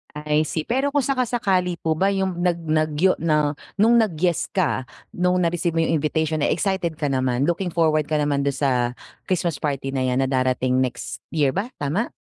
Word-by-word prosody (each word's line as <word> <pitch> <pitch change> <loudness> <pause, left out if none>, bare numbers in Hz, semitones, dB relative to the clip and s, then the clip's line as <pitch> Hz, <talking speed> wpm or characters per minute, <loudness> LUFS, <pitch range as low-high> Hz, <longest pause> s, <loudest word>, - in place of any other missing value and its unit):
I 150 0 +1
see 160 - -2
pero 265 - 0
kung 285 -2 +2
saka-sakali 230 -9 0
po 160 - +1
ba 190 - +2
'yong 190 -2 -1
nag 175 -1 +1
nag 155 -1 +1
yo 185 +5 +4
na 150 -2 +2 0.2
no'ng 225 +4 +4
nag-yes 175 -5 0
ka 150 -8 0 0.3
no'ng 180 0 +2
na-receive 170 0 0
mo 165 - +3
'yong 165 - +1
invitation 155 +1 0
eh, - - +2
excited 180 -3 -1
ka 150 -1 -2
naman? 130 -1 0
Looking 175 +2 -1
forward 155 -3 +2
ka 155 - -1
naman 145 -1 +1
do'n 140 -1 0
sa 140 -1 +1 0.6
Christmas 170 -5 -1
party 140 -2 -2
na 135 -1 -1
'yan 125 +1 +1
na - - 0
darating 130 -1 +1
next 130 -2 -3
year 145 -4 +2
ba 195 - -2
tama? 160 +12 -1
160 Hz, 195 wpm, -22 LUFS, 145-180 Hz, 0.6 s, yo